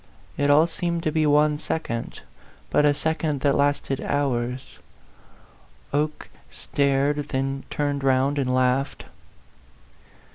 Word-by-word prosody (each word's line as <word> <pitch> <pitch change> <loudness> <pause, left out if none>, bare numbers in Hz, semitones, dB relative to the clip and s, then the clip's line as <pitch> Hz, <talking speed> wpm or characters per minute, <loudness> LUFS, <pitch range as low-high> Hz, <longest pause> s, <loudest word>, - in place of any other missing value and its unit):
It 145 0 +1
all 150 +3 +6
seemed 170 0 -3
to 155 - 0
be 155 -1 +2
one 150 0 +3
second, 115 -9 -4 0.5
but 150 - +4
a 145 - +5
second 160 -2 -1
that 140 -1 +3
lasted 140 -1 0
hours. 125 -3 -2 1.1
Oke 150 +1 -2 0.2
stareu, 140 +1 0
then 135 -1 -3
turned 145 -1 -2
round 135 +2 +2
and 130 -2 0
laughed. 130 +2 0
145 Hz, 115 wpm, -24 LUFS, 135-150 Hz, 1.1 s, all